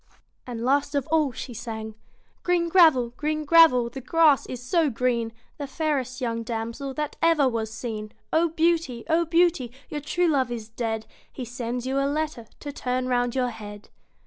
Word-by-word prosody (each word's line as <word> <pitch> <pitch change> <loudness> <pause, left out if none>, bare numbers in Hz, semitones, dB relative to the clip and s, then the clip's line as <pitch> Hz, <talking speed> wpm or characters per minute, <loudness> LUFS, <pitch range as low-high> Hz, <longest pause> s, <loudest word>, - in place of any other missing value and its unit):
And 235 -1 -4
last 285 +2 +1
of 280 -2 0
all 310 -4 +3
she 245 +1 -7
sang 220 -1 -6 0.5
Green 350 -1 +1
gravel! 315 -9 +5
Green 305 0 -2
gravel 320 -5 +7
1 235 - -5
The 270 - -6
grass 305 +1 +4
is 250 - -5
so 310 +5 +1
green, 235 -2 0 0.3
The 285 - -4
fairest 270 -4 -2
young 230 -3 -2
damsel 230 +4 -4
That 300 -1 -3
ever 325 -4 +4
was 225 -3 -2
seen. 220 -2 -5 0.2
O 330 +1 +3
Beauty! 325 -7 0
O 335 +1 +3
Beauty! 330 -7 +2 0.2
Your 295 - -4
true 355 +5 0
love 265 -6 +1
is 225 -2 -5
dead, 225 -1 -3 0.3
He 255 - -6
sends 245 +1 -4
you 265 +1 0
a 275 0 +1
letter 300 -6 -3
To 290 - -5
turn 255 -2 -2
round 245 -1 +1
your 255 -2 +1
head. 205 -2 -10
260 Hz, 180 wpm, -25 LUFS, 235-310 Hz, 0.5 s, gravel